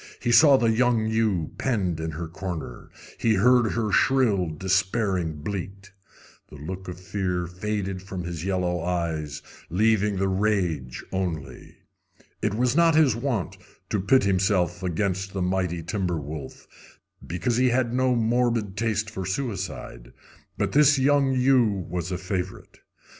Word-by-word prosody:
He 120 - -1
saw 135 +3 +7
the 115 -3 +2
young 120 -1 +2
ewe 110 -7 0
penned 95 -10 0
in 80 0 -3
her 80 +2 -5
corner. 85 -7 -6 0.3
He 115 -1 +2
heard 120 +2 +4
her 110 -3 -1
shrill, 105 -7 +3
despairing 95 -1 -1
bleat. 100 +1 -6 0.6
The - - -12
look 90 +6 -7
of 90 -1 -7
fear 90 -1 -2
faded 95 +1 -3
from 95 -2 -6
his 85 -2 -5
yellow 90 -2 -1
eyes, 80 -4 -3 0.3
leaving 105 +2 +2
the 95 +1 +1
rage 95 -10 -1
only. 80 -8 -4 0.7
It 105 -1 0
was 125 +2 +1
not 165 -1 +4
his 150 -8 +4
wont 120 - -2 0.3
to 105 - +1
pit 130 +8 +3
himself 95 -2 +1
against 95 +1 -2
the 95 - -2
mighty 90 -2 -1
timber 90 -2 -2
wolf, 75 -1 -8 0.6
because 90 +8 -1
he 130 0 +4
had 120 -1 +1
no 130 0 +2
morbid 115 -3 +1
taste 110 -1 -1
for 100 -3 -5
suicide, 95 - -5 0.4
but - - 0
this 145 0 +5
young 140 0 +3
ewe 125 -8 +3
was 90 0 -4
a 90 - -1
favorite. 95 0 -5
95 Hz, 145 wpm, -25 LUFS, 90-115 Hz, 0.7 s, saw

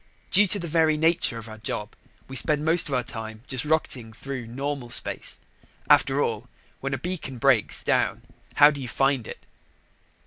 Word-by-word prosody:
Due 205 +1 +6
to 205 - +1
the 175 -3 -5
very 160 -1 +2
nature 160 -6 +1
of 115 0 -8
our 110 0 -10
job, 105 0 -4 0.3
we 135 - -8
spend 150 +2 +3
most 165 +2 +3
of 140 - -4
our 125 - 0
time 110 -1 -7
just 130 -3 -3
rocketing 150 -7 0
through 130 +1 -7
normal 135 +1 -4
space. 120 - -3 0.5
After 140 +1 +4
all, 115 +2 -3 0.3
when 135 0 -2
a - - -4
beacon 170 -7 -5
breaks 115 - +3
down, - - +1 0.3
how 145 +1 +8
do 140 -2 -6
you 130 - -5
find 135 0 0
it? - - -10
135 Hz, 180 wpm, -25 LUFS, 115-150 Hz, 0.5 s, how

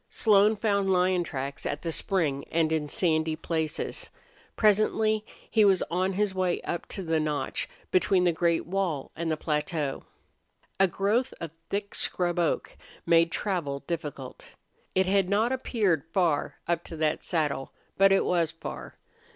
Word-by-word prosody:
Slone 210 0 +4
found 200 -2 +1
lion 180 -1 +3
tracks 140 -3 -5
at 145 - -3
the 165 - -2
spring 160 -6 0
and 160 -1 +1
in 155 -2 -1
sandy 160 -2 +1
places. 160 -1 -3 0.5
Presently 215 0 +3 0.2
he 220 - +3
was 195 -3 +4
on 185 +2 +1
his 205 0 0
way 185 -2 0
up 170 - -4
to 195 - -5
the 160 -2 +1
notch 150 -2 -2 0.2
between 185 0 +3
the 175 - +4
great 170 0 +1
wall 175 -6 -2
and 165 0 -2
the 155 - 0
plateau. 150 -2 -2 0.8
A 195 - +6
growth 210 +8 0
of 165 -2 -5 0.2
thick 200 0 -3
scrub 175 -1 0
oak 170 - 0 0.3
made 165 0 +4
travel 165 -9 -2
difficult. 150 -6 -6 0.4
It 190 0 +4
had 190 -1 +2
not 215 +4 +2
appeared 210 - 0
far 170 -6 +1
up 170 0 0
to 165 - -8
that 155 -1 0
saddle, 150 -5 -1 0.2
but 195 0 +5
it 195 - +4
was 170 -3 +2
far. 165 - -8
175 Hz, 155 wpm, -27 LUFS, 160-195 Hz, 0.8 s, A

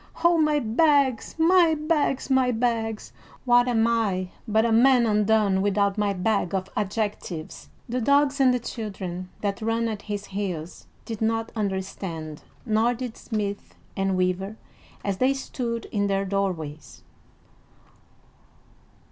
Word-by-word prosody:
"Oh, 340 -1 +5
my 305 -1 +3
bags, 270 0 +2
my 335 0 +5
bags, 300 -3 0
my 260 -1 +4
bags! 225 -2 -2 0.3
What 245 0 +5
am 225 -2 +2
I 205 -6 0 0.2
but 220 +1 +2
a 230 - +1
man 245 +1 +5
undone 210 -2 +2
without 200 0 +1
my 210 -1 +1
bag 195 0 0
of 190 0 -3
adjectives!" 205 -5 -4 0.2
The 250 +1 -2
dogs 280 +3 +3
and 260 -1 +6
the 250 - +2
children 190 -6 -6
that 200 0 -2
ran 225 +1 0
at 215 -2 -4
his 205 -1 -5
heels 185 -5 -5 0.2
did 225 -2 -6
not 225 0 0
understand, 190 -6 -4 0.2
nor 225 +2 +2
did 245 -1 -6
smith 205 -3 -4 0.2
and 195 -1 0
weaver 185 +3 -1 0.5
as 200 -2 -1
they 265 +2 +3
stood 235 -3 -4
in 205 -1 0
their 195 0 0
doorways. 180 -6 -3
220 Hz, 135 wpm, -25 LUFS, 195-245 Hz, 0.5 s, and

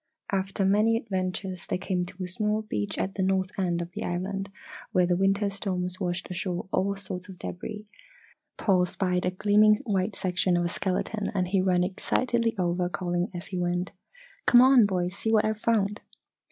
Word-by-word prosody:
After 195 0 0
many 210 +4 +4
adventures 185 -3 -3
they - - 0
came 180 -1 -2
to 185 +1 -7
a - - -3
small 210 +4 -1
beach 105 - -3
at 190 - -1
the 195 - -3
north 190 0 +1
end 175 -2 0
of 170 - -10
the - - -5
island 195 +2 -3 0.4
where 180 -1 +4
the 175 0 +2
winter 195 +2 +2
storms 185 -2 -3
washed 175 -2 -2
ashore 180 -1 -2
all 200 +1 +1
sorts 190 -1 -7
of 185 - -10
debris. 210 +5 -6 0.7
Paul 185 -3 +3
spied 180 -1 0
a - - +3
gleaming 210 +3 +4
white 195 -2 0
section 185 -2 +1
of 175 - +1
a - - 0
skeleton 200 +4 -2
and 180 -2 0
he 195 0 +2
ran 180 -1 +2
excitedly 230 +5 0
over 175 -1 0
calling 175 -1 -1
as 175 -1 -7
he 185 - -3
went: 175 0 -1 0.6
"Come 240 - +8
on, 255 -4 +7
boys! 180 -2 -1
See 220 - -2
what 215 -1 +4
I've 215 0 -1
found!" 210 -2 +1
190 Hz, 185 wpm, -27 LUFS, 180-205 Hz, 0.7 s, Come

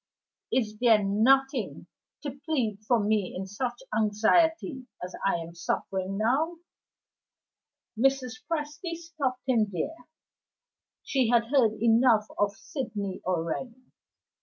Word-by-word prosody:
"Is 215 -4 0
there 225 -4 +5
nothing 260 +7 +2 0.4
to 285 - -3
plead 270 -7 -2
for 240 -2 +4
me 205 -2 0
in 190 - -4
such 240 +6 -4
anxiety 255 +7 +2
as 180 +1 -6
I 195 - +2
am 170 0 -5
suffering 190 +3 -2
now?" 280 +11 +1 1.4
Mrs. 255 0 +1
Presty 315 +2 -3
stopped 310 -7 -3
him 235 -5 +3
there; 320 - -5 1.0
she 260 -4 +1
had 235 -1 +4
heard 230 -6 +5
enough 225 -1 +4
of 205 -1 +1
Sydney 205 -5 -5
already. 185 +9 -3
235 Hz, 110 wpm, -28 LUFS, 205-270 Hz, 1.4 s, there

